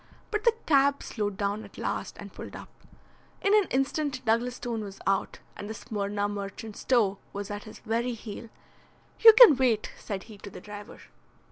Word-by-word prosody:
But 425 +1 -2
the 470 -1 +5
cab 280 -1 +3
slowed 205 -3 -3
down 205 +2 -1
at - - -14
last - - -3
and - - -10
pulled - - -9
up. - - -10 0.7
In 395 - +3
an 420 -3 +5
instant 270 0 -1
Douglas 235 +2 +1
Stone 230 -3 -4
was 200 -1 -9
out, 195 0 0 0.2
and 205 - -7
the 220 - -5
Smyrna 205 -1 -2
merchant's 205 +1 -6
toe 210 -6 +2
was 200 0 -5
at 205 0 -6
his 215 - -11
very 235 +2 -1
heel. 225 0 -8 0.7
"You 450 -1 +10
can 455 - +10
wait," 240 -5 +1
said 195 -2 -5
he 215 -3 -13
to 205 - -9
the - - -10
driver. 205 +2 -10
220 Hz, 180 wpm, -28 LUFS, 205-265 Hz, 0.7 s, You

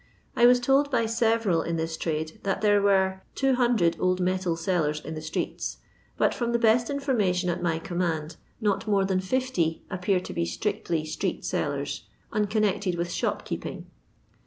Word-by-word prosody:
I 240 - +6
was 245 0 +6
told 270 +3 +3
by 255 -4 +2
sereral 225 -6 +2
in 170 - -2
this 165 0 -2
trade 160 -1 -1
it - - -16
t* - - -22
d. - - -28
that 195 - 0
there 205 -1 +4
were 190 -1 +2
200 240 -10 +2
old 185 0 +1
metal 185 -1 0
seller* 165 -3 0
in 160 - -5
the 155 - -5
streets, 155 - -3 0.4
but, - - +3
from 235 -2 -2
the - - +4
best 230 +1 +3
in 280 0 -1
formation 195 -10 +1
at 175 +1 -4
my 170 -2 +1
command, 165 -3 -2 0.2
not 210 -1 0
more 200 -2 +3
than 190 -1 +1
50 190 -5 -1
appear 185 +1 +1
to 180 - -7
ba - - 0
strictly 155 - -2
ser8f( 155 - -3
sellers, - - -2 0.3
unconnected 210 -3 +1
with 175 0 -2
shopkeep - - -2
Jng. - - -6
190 Hz, 180 wpm, -27 LUFS, 170-225 Hz, 0.4 s, I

